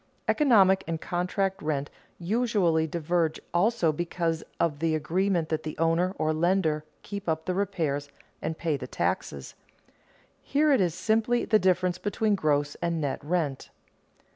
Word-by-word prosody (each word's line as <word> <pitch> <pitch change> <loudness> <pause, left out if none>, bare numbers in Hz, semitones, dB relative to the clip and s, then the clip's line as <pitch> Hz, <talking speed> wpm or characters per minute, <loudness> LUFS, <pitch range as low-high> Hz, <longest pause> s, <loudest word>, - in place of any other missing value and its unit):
Economic 195 -10 +4
and 165 -1 -2
contract 185 +3 -1
rent 145 -2 -2 0.3
usually 185 -5 +1
diverge 165 0 0
also 180 -1 +2
because 165 0 -2 0.2
of 150 -4 0
the 160 0 +1
agreement 170 +2 0
that 155 -1 -1
the 155 -1 -6
owner, 165 +3 +1
or 155 0 +1
lender, 160 -2 +1 0.2
keep 200 -3 -5
up 160 0 -1
the 185 - -1
repairs 160 -8 -1 0.3
and 160 - -3
pay 160 -3 0
the 140 - -6
taxes. 70 -2 -3 0.9
Here 295 +2 +2
it 260 - +3
is 175 -3 +1
simply 225 +4 +1
the 215 - +4
difference 180 -1 +1
between 210 +2 0
gross 145 -5 +1
and 170 -1 0
net 140 -3 -2
rent. 150 -4 -2
170 Hz, 145 wpm, -27 LUFS, 155-195 Hz, 0.9 s, Economic